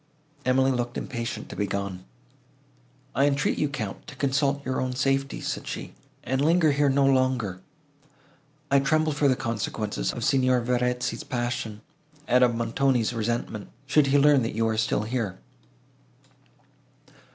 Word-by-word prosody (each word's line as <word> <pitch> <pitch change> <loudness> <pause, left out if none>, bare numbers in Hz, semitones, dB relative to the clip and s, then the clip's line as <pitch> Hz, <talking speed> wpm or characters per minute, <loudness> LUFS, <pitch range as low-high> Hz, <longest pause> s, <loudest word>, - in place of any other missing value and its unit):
Emily 130 +1 +3
looked 120 -1 -2
impatient 120 -2 -4
to - - -7
be 105 - -1
gone. 100 -2 -4 1.1
"I 140 +4 +3
entreat 140 0 +1
you, 150 - +1
Count, 110 -8 -5
to 150 - -9
consult 140 +1 0
your 130 - -1
own 130 -1 -2
safety," 135 +1 0
said - - -4
she, - - -6 0.3
"and 130 +2 0
linger 165 0 +4
here 145 0 +2
no 135 +1 +3
longer. 130 -8 +1 1.1
I 140 - +6
tremble 155 +3 +2
for 145 0 +2
the 130 - +3
consequences 110 - -2
of - - -5
Signor 130 -2 +3
Verezzi's 125 +1 -1
passion, 120 -3 -3 0.5
and 125 +1 +4
of 120 -2 +3
Montoni's 120 +1 +1
resentment, 115 -2 -3 0.2
should 140 +1 +3
he 140 +1 +4
learn 145 -1 +5
that 115 - -3
you 115 0 +1
are 110 - 0
still 110 -1 0
here." 110 -5 -2
130 Hz, 150 wpm, -26 LUFS, 115-140 Hz, 1.1 s, I